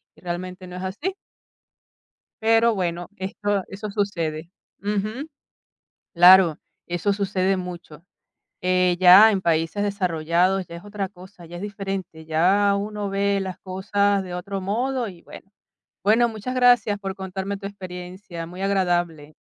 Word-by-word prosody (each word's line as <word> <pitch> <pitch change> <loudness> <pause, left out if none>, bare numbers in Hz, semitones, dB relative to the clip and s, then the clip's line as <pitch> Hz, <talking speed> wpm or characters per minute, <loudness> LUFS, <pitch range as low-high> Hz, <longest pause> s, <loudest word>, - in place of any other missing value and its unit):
y - - -21
realmente 180 +1 -6
no 180 - -9
es 180 - -6
así. 285 - -3 1.3
Pero 225 0 +4
bueno, 175 -2 -2
esto 195 +1 -2
eso 205 +2 -6
sucede. 170 -5 -2 0.3
Ujú. 215 +8 -3 0.8
Claro, 175 -2 +7 0.3
eso 175 +4 -1
sucede 195 -1 0
mucho. 175 -4 -8 0.6
Eh, 180 -1 +2
ya 185 +4 +9
en 195 -2 0
países 165 +4 0
desarrollados 180 -1 +1
ya 170 - -10
es 170 +3 -10
otra 205 -2 -4
cosa, 185 -2 -14
ya 175 - -12
es - - -8
diferente, 195 -5 -5
ya 195 +6 +3
uno 205 0 -3
ve 200 0 +1
las 190 -2 -4
cosas 200 +1 0
de 180 -1 -7
otro 195 +2 -4
modo 240 +6 -1
y, 180 -4 -10
bueno. 195 - -13 0.6
Bueno, 230 +4 +4
muchas 220 +3 -5
gracias 245 -5 +4
por 195 -1 -5
contarme 190 +1 -4
tu 195 - -10
experiencia, 180 -2 -8
muy 180 +3 -9
agradable. 175 -6 0
190 Hz, 140 wpm, -23 LUFS, 180-205 Hz, 1.3 s, ya